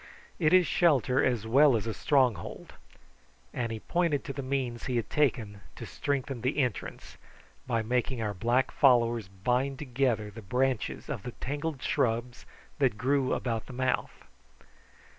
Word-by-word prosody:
"It 155 Hz, -3 st, +3 dB
is 185 Hz, -1 st, +6 dB
shelter 135 Hz, -, +3 dB
as 120 Hz, -4 st, 0 dB
well 135 Hz, +3 st, +5 dB
as 110 Hz, -, -4 dB
a 115 Hz, -, -2 dB
stronghold;" 130 Hz, -5 st, 0 dB, 0.8 s
and 115 Hz, -2 st, -2 dB
he 110 Hz, -, -4 dB
pointed 170 Hz, -5 st, 0 dB
to 145 Hz, -4 st, -5 dB
the 140 Hz, -, -4 dB
means 130 Hz, -3 st, -3 dB
he 125 Hz, -, -1 dB
had 115 Hz, -3 st, -2 dB
taken 115 Hz, -9 st, 0 dB
to -, -, -8 dB
strengthen 135 Hz, -3 st, -3 dB
the 130 Hz, +5 st, -1 dB
entrance, 125 Hz, -8 st, -3 dB, 0.5 s
by 115 Hz, -3 st, 0 dB
making 125 Hz, +2 st, -1 dB
our 105 Hz, -2 st, -2 dB
black 120 Hz, +6 st, +1 dB
followers 120 Hz, -5 st, +3 dB
bind 125 Hz, +8 st, -1 dB
together 125 Hz, -6 st, -1 dB
the 110 Hz, +2 st, -10 dB
branches 125 Hz, +4 st, -1 dB
of 140 Hz, -8 st, -4 dB
the 120 Hz, +2 st, -7 dB
tangled 145 Hz, +1 st, -4 dB
shrubs 120 Hz, +1 st, -1 dB, 0.3 s
that 130 Hz, -7 st, +2 dB
grew 135 Hz, +2 st, +1 dB
about 115 Hz, -3 st, -2 dB
the 130 Hz, -, -9 dB
mouth. 130 Hz, 0 st, -2 dB
125 Hz, 155 wpm, -29 LUFS, 115-140 Hz, 0.8 s, is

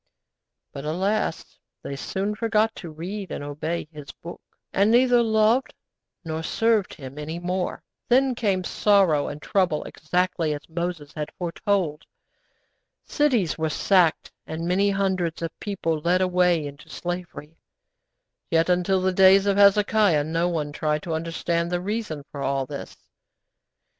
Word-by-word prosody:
But, 140 Hz, -, -7 dB
alas! 190 Hz, +8 st, -2 dB, 0.2 s
they 140 Hz, -, -5 dB
soon 195 Hz, +8 st, -3 dB
forgot 225 Hz, 0 st, +1 dB
to 170 Hz, -, -7 dB
read 180 Hz, +5 st, -6 dB
and -, -, -5 dB
obey 150 Hz, +3 st, -4 dB
His 150 Hz, -3 st, -9 dB
Book, 170 Hz, -, -10 dB, 0.3 s
and 200 Hz, +2 st, +3 dB
neither 245 Hz, +1 st, +5 dB
loved 220 Hz, +3 st, +2 dB, 0.5 s
nor 160 Hz, 0 st, -3 dB
served 220 Hz, +3 st, +1 dB
Him 135 Hz, 0 st, -9 dB
any 155 Hz, +3 st, -5 dB
more. 180 Hz, +1 st, -3 dB, 0.3 s
Then 260 Hz, +1 st, +4 dB
came 200 Hz, -6 st, 0 dB
sorrow 185 Hz, -7 st, +3 dB
and 145 Hz, -, -6 dB
trouble 175 Hz, -2 st, 0 dB
exactly 170 Hz, -1 st, -1 dB
as 145 Hz, -, -10 dB
Moses 170 Hz, -3 st, -4 dB
had 150 Hz, -1 st, -4 dB
foretold. 175 Hz, -3 st, -1 dB, 1.0 s
Cities 245 Hz, -, +1 dB
were 160 Hz, 0 st, 0 dB
sacked, 175 Hz, 0 st, +2 dB, 0.2 s
and 165 Hz, +2 st, -4 dB
many 195 Hz, +3 st, +2 dB
hundreds 190 Hz, -4 st, -1 dB
of 165 Hz, -, -2 dB
people 165 Hz, -6 st, -2 dB
led 175 Hz, +4 st, +2 dB
away 180 Hz, -3 st, +2 dB
into 145 Hz, 0 st, -10 dB
slavery; 175 Hz, -3 st, -6 dB, 0.9 s
yet, 165 Hz, +1 st, +2 dB
until 180 Hz, +1 st, +2 dB
the 185 Hz, 0 st, +1 dB
days 190 Hz, +1 st, +6 dB
of 200 Hz, -1 st, +2 dB
Hezekiah, 205 Hz, -4 st, +4 dB
no 165 Hz, +3 st, 0 dB
one 155 Hz, -4 st, -2 dB
tried 150 Hz, 0 st, -1 dB
to 165 Hz, -, -3 dB
understand 170 Hz, +1 st, -2 dB
the 175 Hz, -, 0 dB
reason 195 Hz, -6 st, -4 dB
for 140 Hz, -, -6 dB
all 135 Hz, 0 st, 0 dB
this. 140 Hz, 0 st, -8 dB
175 Hz, 145 wpm, -24 LUFS, 155-200 Hz, 1.0 s, days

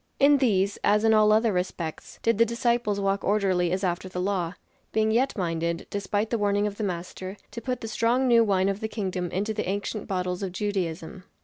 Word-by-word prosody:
In 280 Hz, 0 st, +6 dB
these, 200 Hz, -6 st, +1 dB
as 210 Hz, +1 st, +3 dB
in 220 Hz, 0 st, +5 dB
all 215 Hz, 0 st, +5 dB
other 220 Hz, 0 st, +3 dB
respects, 180 Hz, -3 st, -4 dB
did 230 Hz, -2 st, +2 dB
the -, -, +8 dB
disciples 235 Hz, -2 st, 0 dB
walk 195 Hz, 0 st, 0 dB
orderly 190 Hz, -4 st, +1 dB
as 190 Hz, +2 st, -1 dB
after 180 Hz, 0 st, -1 dB
the 180 Hz, -, -5 dB
law; 180 Hz, -2 st, -1 dB, 0.4 s
being 220 Hz, 0 st, +2 dB
yet 250 Hz, +3 st, +1 dB
minded, 170 Hz, -1 st, -2 dB
despite 205 Hz, +2 st, -1 dB
the 235 Hz, -, 0 dB
warning 205 Hz, 0 st, +2 dB
of 205 Hz, -1 st, -3 dB
the 220 Hz, -, -3 dB
Master, 185 Hz, +1 st, -5 dB
to 235 Hz, -, -6 dB
put 255 Hz, 0 st, -3 dB
the 225 Hz, -, -5 dB
strong 235 Hz, +4 st, +1 dB
new 235 Hz, -2 st, +6 dB
wine 195 Hz, -3 st, +2 dB
of 195 Hz, 0 st, -1 dB
the 220 Hz, -, -2 dB
Kingdom 185 Hz, -5 st, -3 dB
into 205 Hz, +5 st, -2 dB
the 210 Hz, -3 st, -3 dB
ancient 205 Hz, +1 st, -3 dB
bottles 180 Hz, -1 st, -2 dB
of 190 Hz, -3 st, -3 dB
Judaism. 185 Hz, -3 st, -3 dB
200 Hz, 210 wpm, -26 LUFS, 185-220 Hz, 0.4 s, the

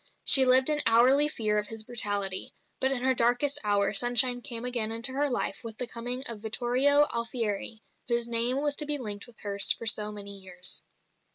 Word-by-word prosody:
She 270 Hz, -2 st, +7 dB
lived 255 Hz, +1 st, +2 dB
in 295 Hz, -1 st, +4 dB
hourly 255 Hz, +6 st, +4 dB
fear 215 Hz, -7 st, -1 dB
of 210 Hz, -, -6 dB
his 225 Hz, -1 st, -6 dB
brutality; 205 Hz, -5 st, 0 dB, 0.2 s
but 265 Hz, 0 st, -1 dB
in 250 Hz, -2 st, -3 dB
her 260 Hz, 0 st, +1 dB
darkest 245 Hz, +4 st, +1 dB
hour 205 Hz, -1 st, 0 dB
sunshine 245 Hz, +3 st, +3 dB
came 235 Hz, 0 st, -3 dB
again 235 Hz, -3 st, 0 dB
into 230 Hz, +3 st, -1 dB
her 285 Hz, +2 st, -1 dB
life 245 Hz, -, -3 dB
with 225 Hz, -2 st, -8 dB
the 250 Hz, -, -2 dB
coming 245 Hz, +2 st, -2 dB
of 230 Hz, -5 st, +1 dB
Vittorio 255 Hz, +6 st, +1 dB
Alfieri, 230 Hz, -2 st, -5 dB, 0.2 s
whose 235 Hz, -1 st, -1 dB
name 240 Hz, +3 st, +1 dB
was 290 Hz, -1 st, 0 dB
to 300 Hz, -, -1 dB
be 295 Hz, 0 st, +1 dB
linked 210 Hz, -5 st, -7 dB
with 240 Hz, -, -20 dB
hers 200 Hz, -1 st, +2 dB
for -, -, -2 dB
so 210 Hz, -1 st, 0 dB
many 200 Hz, -1 st, -8 dB
years. 180 Hz, -1 st, -3 dB
235 Hz, 195 wpm, -26 LUFS, 210-255 Hz, 0.2 s, She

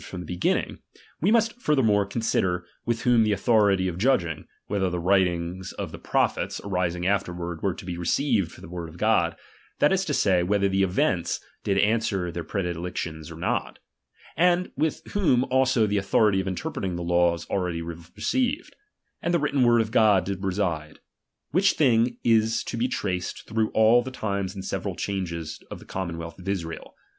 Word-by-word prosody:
^«from 90 Hz, -, -7 dB
the -, -, -8 dB
beginning; 90 Hz, +3 st, -1 dB, 0.4 s
we 180 Hz, -, +3 dB
must 230 Hz, +2 st, +2 dB
furthermore 110 Hz, -, +3 dB
con 115 Hz, +3 st, -4 dB
^uffei^T* -, -, -1 dB
sider, 90 Hz, -4 st, +1 dB, 0.2 s
with 120 Hz, 0 st, -1 dB
whom 120 Hz, -2 st, +4 dB
the 110 Hz, -1 st, +2 dB
authority 100 Hz, -3 st, +3 dB
of 90 Hz, -1 st, -4 dB
judging, 95 Hz, -, +1 dB, 0.2 s
whether 95 Hz, -2 st, 0 dB
the 90 Hz, -, -3 dB
writings 90 Hz, 0 st, 0 dB
of -, -, -5 dB
the -, -, -9 dB
prophets -, -, 0 dB
arising 90 Hz, -3 st, -1 dB
afterward 90 Hz, -4 st, -1 dB
were 95 Hz, -3 st, 0 dB
to -, -, -10 dB
be 90 Hz, -1 st, -5 dB
received 100 Hz, -, +1 dB
for -, -, -14 dB
the -, -, -10 dB
word 85 Hz, -1 st, -6 dB
of 80 Hz, -, -13 dB
God; -, -, +2 dB, 0.4 s
that 145 Hz, -, +4 dB
is 190 Hz, -, +2 dB
say, 105 Hz, -, +2 dB
whether 100 Hz, +2 st, +2 dB
the 95 Hz, 0 st, +1 dB
events 90 Hz, -2 st, +1 dB, 0.2 s
did 100 Hz, -, +1 dB
answer 105 Hz, -4 st, +1 dB
their 85 Hz, 0 st, -4 dB
predic 90 Hz, -2 st, -3 dB
tions 80 Hz, -2 st, -5 dB
or -, -, -9 dB
not; -, -, -2 dB, 0.6 s
and 180 Hz, +2 st, +2 dB
with 160 Hz, 0 st, -1 dB
whom 160 Hz, -12 st, +3 dB
also 130 Hz, -3 st, +3 dB
the 105 Hz, -1 st, +1 dB
authority 100 Hz, 0 st, +3 dB
of 95 Hz, -, -6 dB
interpreting 95 Hz, 0 st, -3 dB
the 85 Hz, -, -4 dB
laws 85 Hz, 0 st, +1 dB
already 90 Hz, -4 st, -1 dB
received, 240 Hz, -, -2 dB, 0.5 s
and 170 Hz, 0 st, +1 dB
the -, -, +3 dB
written 145 Hz, -2 st, 0 dB
word 120 Hz, -1 st, +5 dB
of 110 Hz, -1 st, -3 dB
God, 105 Hz, -6 st, +4 dB
did 100 Hz, 0 st, -4 dB
reside: 90 Hz, -5 st, -2 dB, 0.5 s
which 190 Hz, +6 st, +4 dB
thing 120 Hz, -4 st, +3 dB
is 115 Hz, -1 st, +3 dB
to -, -, -5 dB
be 120 Hz, +2 st, +1 dB
traced 90 Hz, -7 st, -3 dB
through 110 Hz, 0 st, 0 dB
all 110 Hz, +2 st, +6 dB
the 125 Hz, -, -6 dB
times 100 Hz, -6 st, -3 dB
and 95 Hz, -, -6 dB
several -, -, -3 dB
changes 85 Hz, -5 st, -4 dB
of -, -, -6 dB
the -, -, -14 dB
commonwealth 85 Hz, -2 st, -5 dB
of 90 Hz, +2 st, -6 dB
Israel. 85 Hz, -4 st, -4 dB
100 Hz, 185 wpm, -25 LUFS, 90-115 Hz, 0.6 s, all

